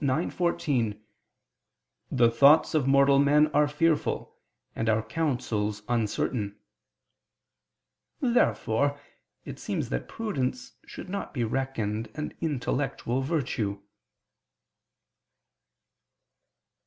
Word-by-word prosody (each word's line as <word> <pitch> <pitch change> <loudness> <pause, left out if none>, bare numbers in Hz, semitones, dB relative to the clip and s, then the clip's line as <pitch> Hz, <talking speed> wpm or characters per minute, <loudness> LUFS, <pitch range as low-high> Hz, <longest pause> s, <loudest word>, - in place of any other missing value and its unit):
9:14): 135 -6 0 1.1
"The 120 -2 +4
thoughts 140 +7 +5
of 150 -4 +1
mortal 140 0 +5
men 145 +2 +5
are 150 0 +4
fearful, 155 +2 0 0.4
and 115 - -1
our 110 0 +2
counsels 110 -6 -2
uncertain." 110 -2 -1 1.6
Therefore 145 - +1 0.5
it - - -8
seems - - -3
that - - -3
prudence 225 - -3 0.2
should - - -9
not 200 -3 -5
be 120 - 0
reckoned 115 -3 -2
an 150 0 -4
intellectual 135 -4 -1
virtue. 125 -9 -2
135 Hz, 85 wpm, -27 LUFS, 115-150 Hz, 1.6 s, thoughts